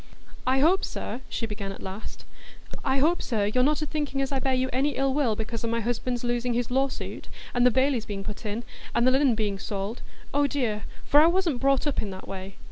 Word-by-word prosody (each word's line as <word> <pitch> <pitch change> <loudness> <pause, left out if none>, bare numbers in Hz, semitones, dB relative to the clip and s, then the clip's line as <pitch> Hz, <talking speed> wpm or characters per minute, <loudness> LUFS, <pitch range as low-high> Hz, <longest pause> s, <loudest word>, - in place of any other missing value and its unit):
"I 265 +1 +4
hope, 360 +6 +4
sir," 255 - -4
she 230 - -2
began 205 -2 -4
at 195 - -9
last,—"I 220 +6 -6
hope, 320 +6 +3
sir, 215 -5 0
you're 250 +5 +2
not 300 +3 +2
a - - 0
thinking 295 -2 -2
as 270 0 0
I 270 - +1
bear 265 0 +1
you 255 0 +1
any 280 +3 +1
ill 270 0 +1
will 265 -6 +2
because 225 +1 -4
o' - - 0
my 230 0 0
husband's 240 +2 -1
losing 240 0 0
his 245 0 -1
lawsuit, 270 +1 -1 0.3
and 245 0 +5
the - - +7
bailies 260 -2 +2
being 195 -1 -4
put 210 +2 -6
in, 215 +2 -3 0.3
and 235 - +4
the 255 - +6
linen 265 -2 +4
being 205 -3 -1
sold,—oh 220 +8 -2
dear!—for 255 +1 +1
I 310 - +7
wasn't 340 -7 +1
brought 275 +1 +3
up 290 - 0
in 210 - -4
that 190 -1 -8
way. 190 0 -6
250 Hz, 215 wpm, -27 LUFS, 220-275 Hz, 0.3 s, the